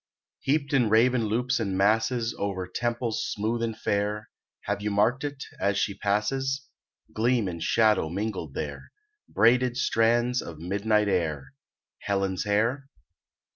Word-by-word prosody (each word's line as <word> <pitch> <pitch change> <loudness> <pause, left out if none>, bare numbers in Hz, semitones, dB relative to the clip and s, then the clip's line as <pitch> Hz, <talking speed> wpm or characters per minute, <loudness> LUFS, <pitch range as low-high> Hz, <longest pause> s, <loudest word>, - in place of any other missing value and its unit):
Heaped 145 +1 0
in 125 -5 +3
raven 115 +2 +4
loops 125 +4 0
and 100 -4 -1
masses 115 +4 +2
Over 95 -2 -2
temples 120 +3 -2
smooth 110 +3 -1
and 115 -1 -2
fair, 105 +1 -2 0.3
Have - - -3
you 105 - -1
marked 105 +7 +2
it, 145 -1 -4 0.2
as 100 0 +1
she 100 - 0
passes, 130 +8 -1 0.5
Gleam 115 -1 +1
and 85 -2 -5
shadow 110 -7 +3
mingled 95 -5 -4
there, 70 -1 -5 0.4
Braided 120 +2 +3
strands 120 +1 +2
of 85 -2 -8
midnight 100 +5 +1
air, 75 -8 -1 0.5
Helen's 95 -1 -1
hair? 115 +7 0
110 Hz, 135 wpm, -27 LUFS, 100-120 Hz, 0.5 s, raven